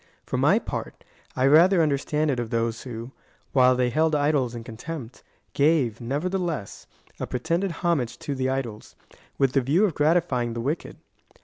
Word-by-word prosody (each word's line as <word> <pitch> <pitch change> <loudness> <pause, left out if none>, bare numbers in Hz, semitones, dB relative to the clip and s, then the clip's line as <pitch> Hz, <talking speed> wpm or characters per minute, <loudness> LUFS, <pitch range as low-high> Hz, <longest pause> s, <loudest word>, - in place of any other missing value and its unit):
For - - -2
my - - +4
part, - - -5 0.3
I 130 - +2
rather 170 +7 +6
understand 150 +1 0
it 125 - -1
of 120 -2 -3
those 115 0 -1
who, 120 0 -7 0.4
while 130 -1 +5
they 125 -1 +1
held 155 +3 +2
idols 145 -5 +1
in 115 - -6
contempt, 125 +2 -8 0.3
gave, 140 -7 +2
nevertheless, 155 - -3 0.3
a - - -3
pre 125 - -3
tended 170 +7 0
homage 145 -9 0
to 160 -3 -4
the 130 -1 -1
idols, 120 -5 -4 0.4
with 135 -2 +2
the 135 - +3
view 155 - +3
of 190 - -1
gratifying 145 -6 +1
the 115 - -4
wicked. 145 +7 -3
135 Hz, 170 wpm, -25 LUFS, 120-160 Hz, 0.4 s, rather